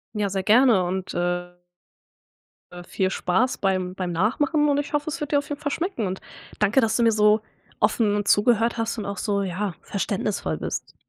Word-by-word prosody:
Ja 205 -1 0
sehr 190 0 -2
gerne 225 -2 +5
und 185 +1 -3
äh 175 0 -3 1.1
äh, 175 0 -9
viel 185 +1 -1
Spaß 210 +9 0
beim 185 -2 -1
beim 180 -2 -3
Nachmachen 290 - +1
und 285 0 +2
ich 290 - -5
hoffe 295 +1 0
es 335 - -5
wird 295 - -4
dir 285 - +5
auf 285 - -8
jeden 290 0 -4
Fall 290 - -2
schmecken 330 - -2
und 185 +1 -5 0.4
danke, 210 +5 +3
dass 220 -2 +1
du 240 - +2
mir 230 - +5
so 210 0 +4 0.4
offen 210 0 +2
und 205 -1 -2
zugehört 230 +3 +3
hast 230 0 -2
und 215 - -4
auch 200 -1 -4
so, 200 0 -1
ja, 190 0 -3
verständnisvoll 200 0 -2
bist. - - -5
210 Hz, 200 wpm, -24 LUFS, 190-240 Hz, 1.1 s, gerne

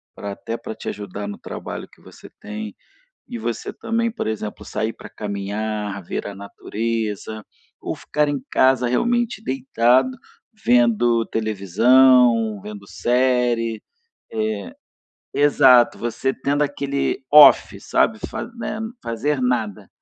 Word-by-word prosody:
pra 100 -1 -6
até 115 +3 -6
pra 110 - -7
te - - -10
ajudar 100 0 -6
no 100 - -6
trabalho - - -7
que - - -22
você - - -14
tem 105 0 -7 0.5
e 240 - -6
você 120 - -4
também, 230 +1 -1
por 235 - -4
exemplo, 110 -1 -5
sair 110 +1 -2
pra - - -12
caminhar, 105 0 -4
ver 85 - -4
a 100 - -6
natureza 110 +1 -4 0.4
ou - - -4
ficar 150 0 -1
em 145 -1 -1
casa, 130 -2 +3
realmente, 235 - 0
deitado, 130 - +2 0.5
vendo 120 -1 +3
televisão, 115 +2 +4
vendo 100 -2 -9
série, 120 -2 +1 0.5
eh 110 -2 -2 0.7
Exato, 130 -4 +5
você 120 +3 -1
tendo 145 +2 0
aquele 140 -1 -1
off, 150 -2 +7
sabe? 110 -1 +1
Fa - - -5
né, 215 -1 -4 0.2
fazer 130 +5 -1
nada, 120 -6 -1
115 Hz, 125 wpm, -21 LUFS, 105-135 Hz, 0.7 s, off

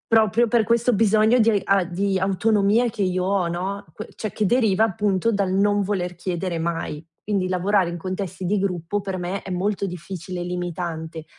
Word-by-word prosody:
Proprio 225 +1 +4
per 230 0 +3
questo 235 +2 +2
bisogno 220 +3 +4
di 220 -2 +4
a 195 -1 +3
di 190 +2 -1
autonomia 205 +4 +2
che 210 - -5
io 185 -1 0
ho, 190 -2 +1
no, 185 +4 -3
que 215 - -8
cioè, 215 - -4
che 215 - -1
deriva 220 -2 +3
appunto 205 0 0
dal 200 -3 0
non 205 +1 +3
voler 185 -3 -2
chiedere 175 -1 -3
mai. 165 -2 -3 0.2
Quindi 200 -3 0
lavorare 185 0 +1
in 175 - -5
contesti 185 +1 -5
di 200 +3 +1
gruppo 185 0 -2
per 195 -1 -4
me 185 +2 -3
è 190 - -7
molto 200 +3 -1
difficile 180 0 -6
e - - -2
limitante, 170 -2 -4
195 Hz, 185 wpm, -23 LUFS, 180-210 Hz, 0.2 s, Proprio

